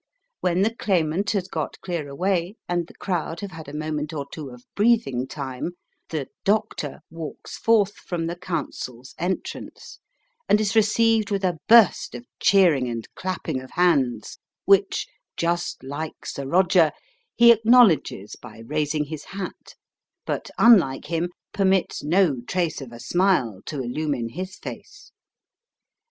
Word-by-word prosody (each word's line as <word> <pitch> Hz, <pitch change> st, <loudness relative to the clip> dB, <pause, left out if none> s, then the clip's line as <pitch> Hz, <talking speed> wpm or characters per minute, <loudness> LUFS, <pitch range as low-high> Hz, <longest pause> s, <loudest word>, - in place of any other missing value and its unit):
When 180 Hz, +1 st, +1 dB
the 225 Hz, +2 st, +1 dB
Claimant 190 Hz, -3 st, 0 dB
has 190 Hz, -3 st, -1 dB
got 160 Hz, -5 st, -4 dB
clear 170 Hz, -5 st, -3 dB
away, 180 Hz, +5 st, -1 dB
and 175 Hz, -1 st, -1 dB
the -, -, -16 dB
crowd 170 Hz, -2 st, -3 dB
have 200 Hz, -2 st, -6 dB
had 160 Hz, -3 st, -9 dB
a -, -, -7 dB
moment 155 Hz, 0 st, -3 dB
or 145 Hz, -3 st, -3 dB
two 150 Hz, -4 st, -7 dB
of 125 Hz, 0 st, -13 dB
breathing 205 Hz, -, +2 dB
time, 135 Hz, +4 st, -5 dB, 0.4 s
the 150 Hz, -5 st, -3 dB, 0.2 s
"Doctor" 205 Hz, -9 st, -1 dB
walks 165 Hz, -2 st, -7 dB
forth 210 Hz, -3 st, +3 dB
from 170 Hz, -2 st, -4 dB
the 170 Hz, +1 st, -3 dB
counsels' 150 Hz, -8 st, -5 dB
entrance, 180 Hz, +3 st, -5 dB, 0.5 s
and 210 Hz, -, +5 dB
is 215 Hz, +1 st, 0 dB
received 225 Hz, 0 st, +3 dB
with 200 Hz, -1 st, -1 dB
a 175 Hz, -3 st, 0 dB
burst 230 Hz, -2 st, +5 dB
of 240 Hz, -, -8 dB
cheering 180 Hz, -, +4 dB
and 115 Hz, -1 st, -5 dB
clapping 185 Hz, -8 st, -3 dB
of 130 Hz, -, -11 dB
hands, 140 Hz, -11 st, +1 dB, 0.3 s
which, 195 Hz, 0 st, +3 dB, 0.3 s
"just 170 Hz, -2 st, -1 dB
like 145 Hz, +4 st, -6 dB
Sir 140 Hz, -1 st, -5 dB
Roger", 175 Hz, 0 st, +4 dB, 0.4 s
he 235 Hz, 0 st, +8 dB
acknowledges 225 Hz, -, +4 dB
by 115 Hz, -1 st, -12 dB
raising 150 Hz, +2 st, 0 dB
his 150 Hz, 0 st, -7 dB
hat, 195 Hz, 0 st, -7 dB, 0.5 s
but, -, -, -3 dB
unlike 185 Hz, -, +5 dB
him, 170 Hz, +1 st, 0 dB, 0.2 s
permits 195 Hz, -2 st, +1 dB
no 155 Hz, -4 st, +2 dB
trace 175 Hz, -5 st, -1 dB
of 130 Hz, -3 st, -8 dB
a 120 Hz, -, -10 dB
smile 175 Hz, -, +1 dB
to 145 Hz, -, -4 dB
illumine 125 Hz, -1 st, -2 dB
his 185 Hz, +8 st, -6 dB
face. -, -, -10 dB
170 Hz, 145 wpm, -24 LUFS, 145-195 Hz, 0.5 s, he